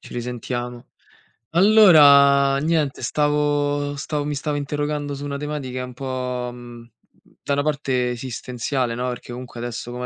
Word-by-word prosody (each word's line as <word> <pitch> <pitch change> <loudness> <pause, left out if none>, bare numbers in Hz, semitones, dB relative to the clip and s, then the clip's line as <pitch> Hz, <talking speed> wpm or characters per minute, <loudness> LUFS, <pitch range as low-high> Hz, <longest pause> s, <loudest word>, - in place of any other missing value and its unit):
ci - - -13
risentiamo. 120 0 -5 0.7
Allora, 145 -8 +6
niente, 155 -2 0
stavo 145 -1 0
stav 145 +1 -3
mi 150 0 -2
stavo 150 +1 -2
interrogando 145 0 -3
su 140 +1 -7
una 140 -1 -4
tematica 140 -3 -4
un 125 0 -8
po', 125 -1 -4
mhmm, 120 -1 -12 0.5
da 140 - -1
una 145 - +1
parte 135 -4 -1
esistenziale, 125 0 -3
no, 125 +1 -2
perché 125 0 -7
comunque, 120 -1 -8
adesso 120 0 -5
come 125 +1 -5
140 Hz, 145 wpm, -22 LUFS, 125-145 Hz, 0.7 s, Allora